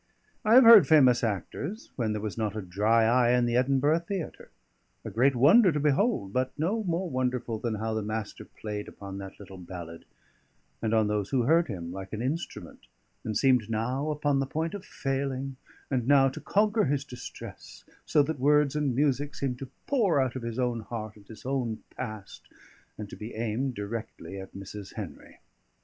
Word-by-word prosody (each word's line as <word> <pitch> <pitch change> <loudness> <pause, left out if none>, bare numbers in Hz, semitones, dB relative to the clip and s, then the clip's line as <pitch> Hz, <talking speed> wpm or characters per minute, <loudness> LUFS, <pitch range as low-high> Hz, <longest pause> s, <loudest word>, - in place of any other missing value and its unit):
I 215 +2 +5
have 260 - +9
heard 230 -3 +9
famous 130 -7 +5
actors, 130 - -3
when 115 -4 -1
there 105 0 -3
was 110 - -3
not 110 -2 -2
a 110 - -3
dry 105 +5 +2
eye 120 +1 +4
in 120 - +2
the 120 0 0
Edinburgh 135 +5 +3
theatre; 175 0 -6 0.6
a - - -5
great 130 +4 +3
wonder 180 - +6
to 150 - -1
behold; 150 - +1
but 130 0 -1
no 195 +9 0
more 175 +1 -1
wonderful 125 -5 -2
than 115 -1 -2
how 110 +1 -2
the 110 - -1
Master 110 0 -4
played 105 -1 -6
upon 100 -1 -8
that 95 -1 -9
little 95 -2 -11
ballad, 85 -2 -9 0.8
and 115 0 +1
on 110 -1 +4
those 105 -1 -1
who 130 -3 +1
heard 165 +7 +3
him, 85 -6 -5
like 95 +1 -8
an 110 - -3
instrument, 155 +7 -5 0.4
and 110 -2 -1
seemed 125 -5 +3
now 125 +7 -1
upon 145 -2 +1
the 135 - -1
point 160 +3 -2
of 200 -2 -6
failing, 135 -1 -3 0.4
and 125 -3 0
now 135 -1 +6
to - - -9
conquer 210 +1 +2
his 140 -1 0
distress, 125 -3 -10 0.2
so 150 - +3
that 150 -1 -3
words 150 +1 +3
and 145 -5 0
music 145 +1 +1
seemed 125 -3 -3
to 135 - -7 0.2
pour 210 - +2
out 130 -2 0
of 130 - -4
his 115 0 -5
own 125 -2 0
heart 110 0 -6
and 100 -2 -18
his 110 - -13
own 125 -4 -1 0.2
past, 110 -2 -7 0.6
and 105 - -6
to - - -9
be 110 +2 -8
aimed 120 +4 -2
directly 105 -1 -6
at 95 0 -10
Mrs. 100 +1 -9
Henry. - - -8
125 Hz, 190 wpm, -28 LUFS, 110-145 Hz, 0.8 s, have